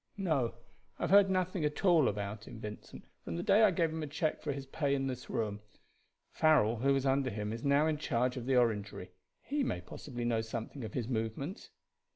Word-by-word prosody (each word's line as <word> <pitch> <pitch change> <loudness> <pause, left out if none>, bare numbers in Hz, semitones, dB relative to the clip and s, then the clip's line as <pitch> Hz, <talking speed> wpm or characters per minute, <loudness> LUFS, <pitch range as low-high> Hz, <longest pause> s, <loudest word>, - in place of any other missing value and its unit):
"No; 155 - 0 0.4
I - - -5
have - - 0
heard 200 0 +7
nothing 185 -2 0
at 150 +5 -1
all 170 -7 +5
about 105 +1 -3
him, 110 - -9
Vincent, 105 -1 -9 0.2
from 85 - -5
the 85 - -3
day 210 - +5
I 215 - +7
gave 170 -3 +1
him 160 0 -4
a 155 - -3
check 155 +2 -1
for 150 - -2
his 140 -1 -5
pay 140 +1 0
in 135 -1 -1
this 125 -2 -5
room. 105 -2 -2 0.7
Farrell, 135 -8 +4
who 135 +5 +2
was 135 0 0
under 135 0 +2
him, 105 -1 -3
is 115 - -6
now 140 +2 +4
in 155 -2 0
charge 125 -3 0
of 125 -1 -5
the 135 - +3
Orangery. 105 -6 0 0.3
He 290 +1 -1
may - - -1
possibly 120 -4 -7
know 115 -1 +1
something 115 +3 -6
of 110 - -6
his 120 -3 -2
movements." 120 - -3
135 Hz, 215 wpm, -33 LUFS, 115-155 Hz, 0.7 s, heard